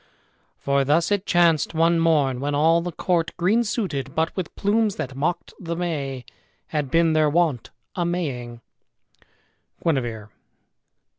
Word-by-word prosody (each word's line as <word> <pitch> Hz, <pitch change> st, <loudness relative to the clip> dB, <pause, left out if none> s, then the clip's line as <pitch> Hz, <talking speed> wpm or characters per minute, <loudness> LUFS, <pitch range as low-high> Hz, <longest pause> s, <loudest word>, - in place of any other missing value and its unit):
"For 140 Hz, 0 st, +1 dB
thus 155 Hz, +7 st, +2 dB
it 205 Hz, -1 st, 0 dB
chanced 165 Hz, -3 st, +3 dB
one 165 Hz, +1 st, +3 dB
morn 150 Hz, -6 st, +2 dB
when 145 Hz, +2 st, -1 dB
all 165 Hz, +3 st, +4 dB
the 175 Hz, +1 st, -4 dB
court, 170 Hz, 0 st, -1 dB
Green 200 Hz, +7 st, +2 dB
suited, 170 Hz, -, -3 dB
but 160 Hz, +1 st, 0 dB
with 185 Hz, -3 st, -5 dB
plumes 210 Hz, 0 st, +1 dB
that 130 Hz, -, -5 dB
mock'd 165 Hz, +5 st, -2 dB
the 170 Hz, -2 st, -4 dB
May, 140 Hz, -7 st, -3 dB, 0.4 s
Had 150 Hz, -3 st, -2 dB
been, 165 Hz, +2 st, +3 dB
their 155 Hz, -1 st, +3 dB
wont, 155 Hz, -7 st, +1 dB, 0.2 s
a 175 Hz, -, -1 dB
maying" 130 Hz, -9 st, -3 dB, 1.2 s
Guinevere. 120 Hz, -9 st, -1 dB
165 Hz, 140 wpm, -23 LUFS, 140-175 Hz, 1.2 s, all